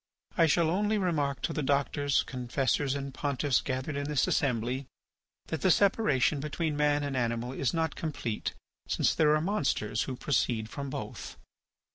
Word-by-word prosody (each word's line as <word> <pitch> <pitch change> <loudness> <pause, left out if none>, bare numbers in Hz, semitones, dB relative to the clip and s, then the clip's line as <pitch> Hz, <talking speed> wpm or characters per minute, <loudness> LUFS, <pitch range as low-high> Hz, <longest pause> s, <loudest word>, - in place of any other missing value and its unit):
I 165 -2 +5
shall 160 +1 +3
only 210 +4 +1
remark 150 - 0
to - - -1
the - - -1
doctors, 140 0 +1
confessors, 130 +2 -1
and 140 -1 -4
pontiffs 140 -1 0
gathered 130 +3 -3
in 140 0 -2
this 150 -1 +1
assembly 125 0 0 0.6
that 160 - -3
the 185 - +3
separation 165 - +3
between 150 +2 -2
man 145 0 +2
and 140 -2 -2
animal 120 0 -1
is 135 -2 0
not 160 -2 0
complete 130 -9 -3 0.3
since - - +2
there 150 -2 +4
are 155 - +1
monsters 140 - 0
who 130 - -3
proceed 120 -5 0
from 140 -1 -5
both. - - -6
140 Hz, 160 wpm, -30 LUFS, 130-155 Hz, 0.6 s, I